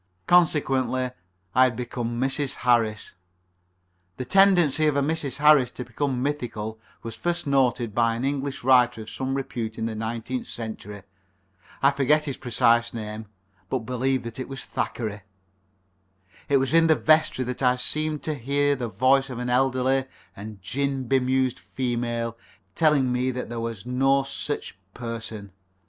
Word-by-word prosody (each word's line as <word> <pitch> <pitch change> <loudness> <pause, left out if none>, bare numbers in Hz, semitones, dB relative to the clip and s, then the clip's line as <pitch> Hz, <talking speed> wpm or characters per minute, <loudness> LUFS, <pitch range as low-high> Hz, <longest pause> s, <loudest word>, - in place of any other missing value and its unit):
Consequently, 135 - +2 0.4
I 130 +1 +6
had 125 -3 0
become 120 -1 -4
Mrs. 135 +1 0
Harris. 115 -3 +2 1.0
The 130 - -4
tendency 175 -5 +4
of 150 - +2
a - - +3
Mrs. 145 -3 -2
Harris 150 -4 +5
to 125 - -7
become 130 +1 -2
mythical 115 -6 -3 0.2
was 115 - -6
first 175 0 -2
noticed 130 -5 +1
by 115 0 +2
an 120 +3 -3
English 140 -1 -2
writer 125 -2 +4
of 110 - -11
some 135 0 -3
repute 115 -4 -4
in 110 - -2
the 115 - -2
nineteenth 115 +3 -4
century. 105 -3 -7 0.8
I 140 - +6
forget 145 +2 +2
his 140 -3 -3
precise 120 -1 +2
name, 110 -1 -6 0.4
but 125 -4 -2
believe 130 +1 0
that 115 +1 -7
it 130 - -5
was 135 -1 -6
Thackeray. 105 -3 -3 1.3
It 140 - +5
was 135 +2 0
in 165 0 +6
the 160 - +5
vestry 155 -5 +3
that 125 +2 -5
I 125 -1 +4
seemed 155 +4 -2
to 155 - -1
hear 145 +2 +1
the 125 -3 -3
voice 135 +4 +3
of 125 - -6
an 125 0 -2
elderly 130 +1 +2 0.3
and 105 0 -9
gin 135 +3 -2
bemused 130 0 +1
female 120 -2 -3 0.4
telling 145 -4 +3
me 125 +1 0
that 125 -2 -4
there 120 0 -4
was 115 -3 -5
no 135 +2 +2
sich 140 -1 -4 0.2
person. 115 -4 -6
130 Hz, 155 wpm, -25 LUFS, 115-140 Hz, 1.3 s, I